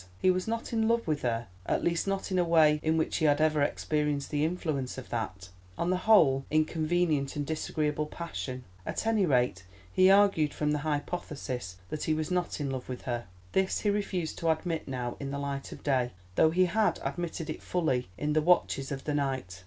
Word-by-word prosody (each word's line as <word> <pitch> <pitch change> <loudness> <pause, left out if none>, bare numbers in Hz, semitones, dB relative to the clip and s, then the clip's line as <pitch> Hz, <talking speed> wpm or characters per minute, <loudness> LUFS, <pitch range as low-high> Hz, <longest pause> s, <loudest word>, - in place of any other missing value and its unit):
He 185 - +4
was 185 +2 -1
not 230 +1 -3
in 220 -1 +2
love 230 0 +2
with 155 -2 0
her, 115 -1 -1 0.2
at - - 0
least 170 +2 0
not 195 0 -2
in 185 - +2
a - - +4
way 160 -3 +5
in 160 0 +1
which 160 - 0
he 160 - +1
had 145 0 +4
ever 155 -1 +3
experienced 150 0 0
the 145 -1 +1
influence 155 -6 -2
of 130 - -8
that, 95 -6 -4 0.3
on 175 - 0
the 185 - +2
whole, 135 -11 +6
inconvenient 155 -1 +1
and 145 -1 -2
disagreeable 150 -1 -1
passion. 130 - -5 0.2
At - - -3
any 220 -4 +3
rate 125 - +2 0.3
he 185 0 +6
argued 195 -7 +4
from 150 0 0
the 150 - +1
hypothesis 145 - -3
that 155 - -3
he 155 - +2
was 155 +2 -2
not 180 -2 -1
in 140 -2 -2
love 130 -1 -5
with 125 - -5
her. 120 -5 -3 0.2
This 190 0 +1
he 205 - +2
refused 190 -5 -2
to 165 - 0
admit 160 0 -1
now 125 -2 -3
in 140 - -4
the 140 - -3
light 140 -1 -4
of - - -10
day, 130 -4 +1 0.2
though 155 - +5
he 185 +3 +3
had 210 +4 +1
admitted 170 -2 -3
it - - -7
fully 145 - 0
in 150 +5 -1
the 155 - +3
watches 150 -5 +2
of 135 -1 -4
the 150 - -2
night. 130 -11 -2
155 Hz, 210 wpm, -29 LUFS, 135-175 Hz, 0.3 s, whole